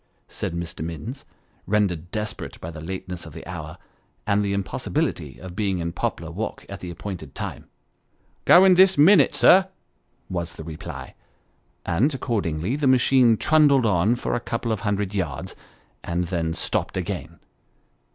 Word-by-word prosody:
said 85 - -4
Mr. 85 -2 -5
Minns, 105 - -6 0.4
rendered 95 -5 0
desperate 105 +1 -5
by 80 - -6
the 80 -1 -9
lateness 90 +1 -6
of - - -11
the - - -9
hour, - - -7 0.5
and 105 0 +2
the 100 - -1
impos 100 -4 -3
sibility 65 -5 -1
of 90 +3 -9
being 100 -2 0
in 85 -1 -2
Poplar - - -3
Walk - - -5
at - - -8
the 90 - -7
appointed 85 -5 -7
time. - - -6 0.4
" - - -41
Going 185 +1 +8
this 190 +1 +6
minute, 180 +8 +6
sir," 190 +1 +6 0.6
was 85 -4 -4
the - - -8
reply; 80 -1 -8 0.7
and, 115 - +2
accordingly, 100 - -1
the 145 -1 0
machine 125 -2 +5
trundled 145 -4 +4
on 105 +3 +3
for 120 - -3
a - - +1
couple 115 0 -3
of 110 - -1
hundred 100 -2 -1
yards, 80 -9 -3 0.5
and 85 +1 -1
then 85 -2 -2
stopped - - -2
again. 85 -3 -4
95 Hz, 160 wpm, -24 LUFS, 85-120 Hz, 0.7 s, Going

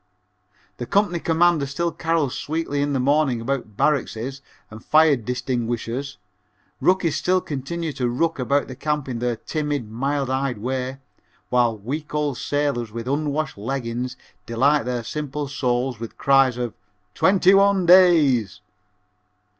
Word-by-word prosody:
The 120 - -5
company 200 -4 +1
commander 165 -3 +2
still 170 +5 -2
carols 160 -6 -1
sweetly 150 0 -2
in 145 0 0
the 135 - 0
morning 140 -2 +2
about 115 -4 -4
"barrackses" 135 -2 -1 0.3
and 110 +1 -11
fire 155 -1 +5
"distinguishers," 125 +1 -3 0.6
rookies 175 -5 +2
still 185 +4 +2
continue 155 +1 -4
to 125 -3 -1
rook 160 +6 -1
about 140 +3 +1
the 130 - -8
camp 150 0 -2
in 120 -3 -4
their 120 0 -1
timid, 145 -4 -3
mild 135 +4 -1
eyed 130 -2 -1
way, 130 +3 -3 0.5
while 120 -3 +2
week 145 +9 -5
old 145 -4 -1
sailors 140 -6 -1
with 115 +2 -6
unwashed 150 -2 -2
leggins 125 +1 -3 0.3
delight 135 +3 +2
their 125 -1 -2
simple 150 +2 -4
souls 125 -2 -1
with 115 -1 -8
cries 135 -3 +3
of 120 -2 -3 0.4
'twenty 190 0 +4
one 195 -1 +4
days.' 160 - +5
135 Hz, 140 wpm, -22 LUFS, 125-155 Hz, 0.6 s, fire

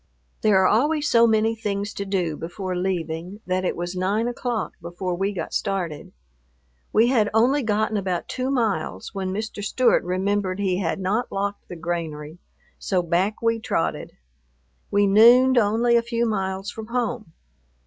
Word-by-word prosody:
There 210 -3 +4
are 190 - +4
always 295 +6 +2
so 235 -3 +5
many 220 0 +2
things 205 -2 -3
to 200 - -4
do 180 -5 -1
before 180 +4 -5
leaving 180 +1 -3
that 185 0 -1
it 180 - -1
was 175 +1 -4
nine 200 +5 0
o'clock 245 -1 -3
before 175 +2 -4
we 195 +3 -1
got 175 -5 -5
started. 180 -7 -3 0.8
We 230 +3 +4
had 220 -5 +3
only 255 +6 +4
gotten 215 -1 0
about 185 -3 -2
two 255 +1 -3
miles, 230 -9 -1
when 190 -2 -3
Mr. 215 +1 -4
Stewart 250 +4 +2
remembered 185 +1 -1
he 190 -3 0
had 190 0 -1
not 205 +6 -1
locked 200 +1 -3
the 180 - -8
granary, 165 -2 -5 0.4
so 185 -3 0
back 185 +6 0
we 230 0 +2
trotted. 80 - -2 0.8
We 205 0 +3
nooned 240 +5 +6
only 230 +3 +2
a 235 - +5
few 235 0 -1
miles 195 -2 -2
from 220 -1 -8
home. 235 -6 -3
200 Hz, 160 wpm, -23 LUFS, 185-225 Hz, 0.8 s, nooned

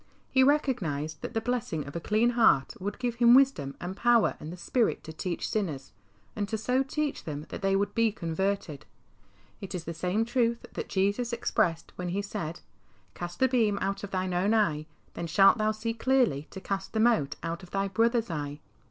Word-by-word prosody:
He 260 - +4
recognised 165 - 0
that - - -6
the 225 - +1
blessing 225 - -2
of 145 - -9
a - - -1
clean 215 +7 +2
heart 225 - +4
would 205 +2 -4
give 245 -2 -2
him 240 0 +7
wisdom 255 - +3
and 180 +2 -5
power 240 +1 +3
and 155 - -7
the 180 - -8
spirit 235 +6 0
to 160 - -8
teach 170 +2 -3
sinners, 165 -11 -3 0.4
and 205 -1 -2
to 220 - -1
so 250 +4 +1
teach 290 +2 -2
them 150 -1 -5
that - - -6
they 195 -1 +2
would 200 +1 0
be 230 -1 +3
converted. 190 -4 -3 0.7
It 195 -1 -6
is 175 - -4
the 170 - -5
same 185 +7 0
truth 235 -1 0
that - - -5
Jesus 200 +5 0
expressed 170 -8 0
when 180 0 -3
He 200 +3 -1
said, 175 -5 -5 0.3
" 95 -3 -35
Cast 175 0 -6
the 260 - +5
beam 225 -5 +2
out 195 +1 -2
of 200 - -5
thine 185 -1 -2
own 195 +5 +2
eye, 155 -8 +1 0.3
then 170 - -4
shalt 195 +6 +5
thou 215 0 +2
see 215 +1 -3
clearly 230 - +1
to 190 - -8
cast 195 0 -4
the 220 - 0
mote 220 -11 +3
out 170 +1 -3
of 180 - -13
thy 195 +1 -1
brother's 230 +2 +1
eye." 145 -2 -4
200 Hz, 205 wpm, -28 LUFS, 170-230 Hz, 0.7 s, him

